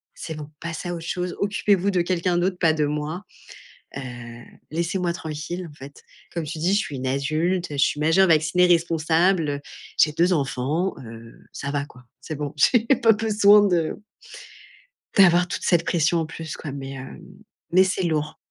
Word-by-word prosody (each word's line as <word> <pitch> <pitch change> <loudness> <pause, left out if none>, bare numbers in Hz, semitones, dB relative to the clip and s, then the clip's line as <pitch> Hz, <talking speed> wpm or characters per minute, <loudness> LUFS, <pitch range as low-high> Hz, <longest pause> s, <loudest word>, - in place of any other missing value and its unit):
C'est 160 - -6
bon, 150 -1 -7
passez 170 +1 -5
à 175 - -3
autre 165 - -7
chose, 180 -1 -3
occupez-vous 200 -1 +1
de 180 -2 +2
quelqu'un 175 0 0
d'autre, 180 +1 0
pas 165 -3 +4
de 155 -1 +1
moi. 150 +5 -3 0.7
Heu, - - -3 0.7
laissez-moi 170 +2 -1
tranquille, 165 +3 -5
en - - -15
fait. 140 0 -12 0.3
Comme 170 -2 -3
tu 155 +2 -6
dis: 175 +5 +1
«Je - - +4
suis 150 -9 -4
une 130 0 -4
adulte, 155 +7 0
je - - -4
suis 145 +1 +2
majeure, 165 +5 +4
vaccinée, 160 +3 +4
responsable, 165 -2 +2 0.4
j'ai 150 - +5
2 175 +4 +2
enfants, 150 +5 -1
heu,» 115 0 -11 0.2
ça 140 - -5
va 140 -1 -1
quoi. 125 -3 -17 0.2
C'est 155 +2 -6
bon, 145 +1 -5
j'ai 235 -2 +4 0.2
pas 225 - +7
besoin 210 -1 +5
de 170 -4 0 1.2
d'avoir 180 -2 +6
toute - - -5
cette 175 -2 +2
pression 170 0 +2
en 165 - -1
plus 160 -1 -7
quoi 145 - -7
mais, 135 -1 -6
hem, 135 -1 -9 0.5
mais 185 +2 +6
c'est 190 0 -1
lourd. 155 -3 -1
165 Hz, 180 wpm, -23 LUFS, 150-180 Hz, 1.2 s, pas